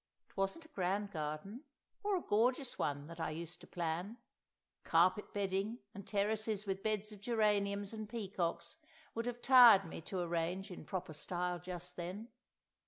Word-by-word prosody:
It - - -26
wasn't 195 +12 -1
a - - -16
grand 200 - -1
garden, 155 - -4 0.4
or 410 -1 +2
a 350 - -4
gorgeous 245 +5 +1
one 145 0 -1
that 165 +2 -10
I - - -1
used 165 +2 -6
to - - -12
plan—carpet 180 0 -1
bedding 200 +3 -1 0.2
and 200 -1 -9
terraces 215 0 0
with 195 -1 -2
beds 215 0 -1
of 205 -2 -11
geraniums 205 -2 +1
and 215 -1 -5
peacocks 195 - -3 0.4
would 230 +1 -2
have 240 0 -4
tired 240 -7 +9
me 165 - -7
to 185 -2 -1
arrange 175 +3 -1
in 175 - -8
proper 185 -1 -4
style 180 +3 -2
just 180 0 -6
then. 185 +6 -5
195 Hz, 160 wpm, -36 LUFS, 175-215 Hz, 0.4 s, tired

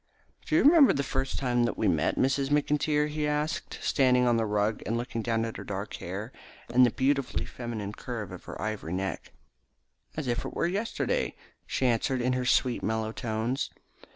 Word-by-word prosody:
"Do - - +1
you 335 - +5
remember 300 -2 +7
the 140 - 0
first 135 0 -2
time 120 -2 +1
that 120 - -2
we - - +1
met, - - +1
Miss 135 +2 +2
McIntyre?" 150 0 +2
he 150 0 -2
asked, 150 +1 -2
standing 125 -2 +3
on 120 -1 +4
the 115 -1 +1
rug 105 +1 0
and 115 - 0
looking 120 -1 -3
down 115 0 0
at 115 - -5
her - - -6
dark 100 +1 -5
hair, 100 +7 -5 0.4
and 125 +1 +7
the 125 - +6
beautifully 135 +2 0
feminine 110 -4 -5
curve 110 -4 -6
of - - -9
her - - -8
ivory 110 -6 -3
neck. 95 +1 -3 0.9
"As 155 - -2
if 120 0 0
it - - -6
were - - +1
yesterday," 225 - -1 0.3
she 130 - -1
answered 125 +2 +1
in 125 +1 +1
her 125 0 -1
sweet 125 0 +2
mellow 110 0 -1
tones. 115 +3 -2
125 Hz, 190 wpm, -28 LUFS, 110-140 Hz, 0.9 s, remember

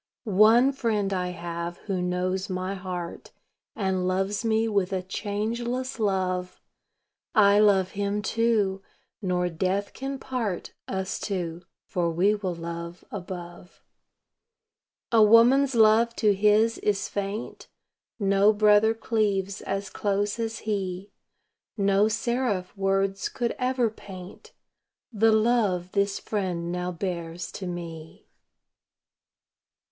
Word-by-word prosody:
One 225 +5 +5
Friend 215 -7 -1
I 180 -1 -1
have 170 -1 -5
who 190 -3 -1
knows 185 +2 -1
my 185 +1 -2
heart, 180 -3 -6 0.5
And 190 -3 0
loves 195 +4 0
me 225 0 +2
with 200 -3 0
a 185 -1 -1
changeless 235 +7 -3
love; 185 -3 -1 0.8
I 205 -2 +6
love 195 -3 +4
Him, 205 +1 -2
too 215 -4 +1 0.4
nor 180 -2 0
death 185 +4 -1
can 270 +1 -4
part 235 -9 -4
Us 190 0 -3
two, 175 -4 -3 0.2
for 175 -5 -1
we 180 +5 +3
will 190 -4 -3
love 170 +1 -7
above. 180 -2 -8 1.3
A 230 -2 +5
woman's 240 +5 +6
love 225 +1 +5
to 210 -2 +3
His 210 +3 +3
is 200 -1 0
faint; 200 +2 -5 0.5
No 200 -1 +4
brother 210 +1 +4
cleaves 205 -3 -1
as 195 0 -4
close 205 +2 -1
as 225 0 -3
He; 195 -2 -3 0.7
No 200 +1 +3
seraph 220 -4 -1
words 195 0 0
could 240 -2 -2
ever 250 -3 +1
paint 195 - -11 0.6
The 225 +1 +4
love 215 -5 +2
this 200 -1 +1
Friend 180 -5 -3
now 180 0 -2
bears 175 -1 -4
to 190 - -6
me. 165 -2 -8
200 Hz, 115 wpm, -26 LUFS, 185-220 Hz, 1.3 s, I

